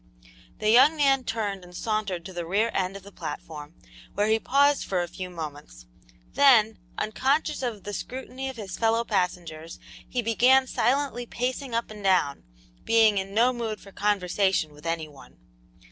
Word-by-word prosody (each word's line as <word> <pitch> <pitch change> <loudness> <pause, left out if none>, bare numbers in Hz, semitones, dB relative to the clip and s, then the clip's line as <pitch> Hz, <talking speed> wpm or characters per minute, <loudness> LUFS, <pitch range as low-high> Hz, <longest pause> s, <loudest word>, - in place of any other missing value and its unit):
The 215 0 +2
young 280 +7 +6
man 270 -3 +3
turned 205 -4 -3
and 180 0 -11
sauntered 205 -6 -2
to 190 - -8
the 175 -1 -4
rear 205 +7 +1
end 190 +1 -1
of 195 - -14
the 200 - -13
platform, 160 -4 -8 0.4
where 205 - +2
he 220 +1 +3
paused 285 +4 +3
for 180 -2 -1
a - - -5
few 185 +1 -7
moments; 145 - -8 0.5
then, 225 -6 +5 0.2
unconscious 270 +8 0
of 230 -6 -4
the 205 - -6
scrutiny 265 +3 -5
of 265 - -7
his 195 -4 -7
fellow 225 0 +2
passengers, 175 -6 -3 0.3
he 245 -1 -1
began 250 +4 +4
silently 255 -1 0
pacing 250 +1 -3
up 230 -1 -2
and 210 -1 -10
down, 185 -7 +2 0.4
being 220 -3 +4
in 195 +1 -6
no 245 +3 +4
mood 225 -3 -4
for 195 - -14
conversation 190 -5 0
with 150 +3 -10
any 165 -1 -2
one. 145 -3 -16
210 Hz, 170 wpm, -26 LUFS, 180-245 Hz, 0.5 s, young